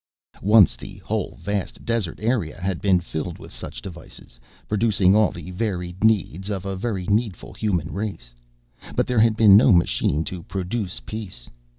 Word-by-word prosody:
Once 105 -1 +6
the - - -10
whole - - -2
vast 100 -1 -4
desert 115 -7 -1
area 110 -8 -1
had 95 -1 -2
been 95 -3 +4
filled 85 0 -5
with - - -12
such - - -8
devices, 85 -8 -10 0.3
producing 105 -3 +3
all 110 0 +4
the 90 - -9
varied 90 -2 -3
needs 100 -3 +1
of 100 -2 -3
a 95 0 -3
very 95 -2 -3
needful 105 -1 -1
human 90 -7 -1
race. 90 - -5 0.6
But - - +2
there 125 -2 +1
had 110 0 +4
been 105 -3 +8
no 110 +4 +7
machine 85 -3 +2
to 90 +1 -6
produce 95 +2 -4
peace. 100 - -7
95 Hz, 165 wpm, -23 LUFS, 90-110 Hz, 0.6 s, been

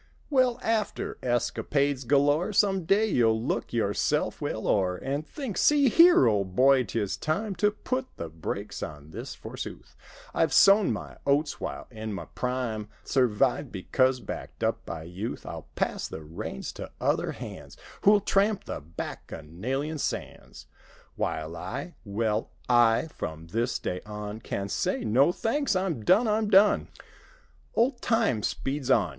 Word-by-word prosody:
Well, 255 -3 +3
after 220 -2 -1
escapades 135 +2 0
galore. 145 - +3
Some 195 -3 +2
day 200 +5 +4
you'll 115 - +3
look 115 - -2
yourself 105 -4 0
well - - -3
o'er 95 -3 +2
And 140 +7 -3
think—"See 280 - +2
here, 335 - +7
old 100 -5 +1
boy, 130 +1 +5
'tis 105 -1 -2
time 195 +7 -2
To 210 +4 +4
put 255 +5 -3
the 85 - -4
brakes 80 0 -5
on 75 0 -7
this - - -7
forsooth: - - -8 0.4
I've 160 - +2
sown 200 0 +6
my - - -6
oats 145 +2 +2
while - - -4
in 110 -2 -5
my 100 - -5
prime. 125 -4 -3
Survived, 130 +2 +1
because 130 +7 +1
backed 100 - -7
up - - 0
by 80 0 -5
youth; 90 +7 -6
I'll - - -7
pass - - -1
the 80 - -8
reigns 75 -4 -6
to - - -8
other - - 0
hands - - -9 0.2
Who'll 205 0 +6
tramp 200 +1 +2
the - - -5
Bacchanalian 95 - -5
sands; - - -5 0.5
While 80 +1 -3
I—^well, 110 - -3 0.2
I—from 115 - +1
this 115 +6 0
day 90 - -4
on 105 0 -6
Can 100 -3 -4
say, - - -1
'No, 130 +9 +4
thanks; 230 +5 0
I'm 185 - -1
done. 210 - +4
I'm 215 0 +1
done!' 205 +1 +5 0.5
" - - -32
Old 240 +1 +2
time 225 - +2
speeds 135 +4 -2
on. 110 -8 +4
130 Hz, 145 wpm, -27 LUFS, -, 0.5 s, here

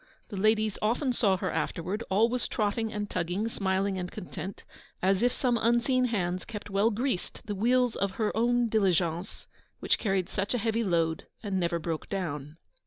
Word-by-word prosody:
The 210 - -6
ladies 215 +1 +2
often 245 +5 +1
saw 200 -5 +3
her 185 -1 -2
afterward, 175 +7 -2
always 230 +5 +2
trotting 220 +1 0
and 210 -1 -3
tugging, 185 +4 -1
smiling 195 -2 0
and 180 0 -3
content, 180 +1 -7 0.4
as 190 +1 +2
if 245 +1 +4
some 240 -2 +1
unseen 240 +2 +3
hands 185 -6 -1
kept 210 -1 -7
well 200 +3 +3
greased 235 -3 -2
the 210 - -3
wheels 245 +4 +2
of 200 -1 -1
her 215 +1 -1
own 240 +1 +3
diligence, 180 -5 0 0.3
which - - +1
carried 195 -4 +1
such 200 +5 -1
a - - +2
heavy 225 0 0
load 165 -4 0 0.2
and 200 -3 -1
never 170 -1 +1
broke 165 -1 -4
down. 150 -6 -4
205 Hz, 175 wpm, -29 LUFS, 185-230 Hz, 0.4 s, if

